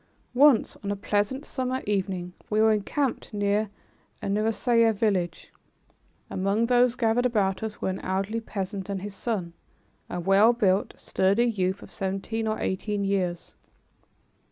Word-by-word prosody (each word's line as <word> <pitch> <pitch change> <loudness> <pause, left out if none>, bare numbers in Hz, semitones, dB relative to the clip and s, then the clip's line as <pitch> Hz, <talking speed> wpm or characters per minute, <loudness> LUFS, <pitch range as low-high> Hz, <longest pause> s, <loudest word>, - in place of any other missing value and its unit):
Once, 270 -2 +5
on 200 - -3
a - - -1
pleasant 205 +7 -1
summer 260 0 -2
evening, 185 -3 -2 0.2
we 215 - +1
were 220 0 +5
encamped 240 +5 -1
near 205 0 0 0.5
a - - -7
Nusairiyeh 225 +2 +2
village. 190 -5 -1 0.7
Among 200 +4 0
those 245 0 +3
gathered 240 +1 +2
about 195 -5 0
us 220 -1 -5
were - - +1
an 190 - -3
elderly 195 +4 -2
peasant 195 -2 -5
and 195 -1 -3
his 205 -1 -5
son, 195 -7 -3 0.6
a 180 - -3
well 195 +6 +5
built, 200 -4 +1
sturdy 200 +5 +2
youth 190 -4 -1
of - - -13
seventeen 195 +4 -3
or 215 - -1
eighteen 200 +2 -2
years. 185 -3 -2
205 Hz, 145 wpm, -26 LUFS, 195-225 Hz, 0.7 s, Once